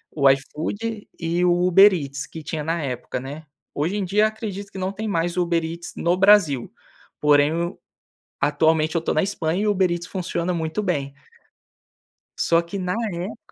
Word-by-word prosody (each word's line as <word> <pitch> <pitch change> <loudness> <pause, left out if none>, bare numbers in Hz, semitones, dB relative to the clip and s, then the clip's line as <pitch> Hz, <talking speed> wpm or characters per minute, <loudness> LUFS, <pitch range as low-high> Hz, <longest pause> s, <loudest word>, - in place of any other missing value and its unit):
o 140 -3 +5
iFood 205 +11 -2
e 170 +1 0
o 180 - +4 0.2
Uber 195 +3 +8
Eats 140 -6 -4
que 160 -1 -9
tinha 155 -1 -4
na 165 0 -1
época, 125 -1 -4
né. 145 +5 -8 0.3
Hoje 160 +8 -1
em 195 - -1
dia 210 +4 +3
acredito 205 -2 -6
que - - -9
não 190 0 -2
tem 215 +2 -5
mais 170 -1 -1
Uber 170 -2 +1
Eats 170 +2 -6
no 175 +1 +1
Brasil, 185 - +4 0.5
porém 145 0 +4
eu, 170 +3 -3 0.6
atualmente 160 0 +2
eu 165 - +2
estou 165 - -1
na 155 - +4
Espanha 185 -1 -1
e - - 0
Uber 190 -3 +2
Eats 175 0 -3
funciona 180 -1 -2
muito 160 +4 -2
bem. 145 -8 -2 1.3
Só 165 0 +3
que 170 +4 -6
na 180 -1 -2 0.2
época 180 +6 -5
170 Hz, 180 wpm, -23 LUFS, 155-195 Hz, 1.3 s, Uber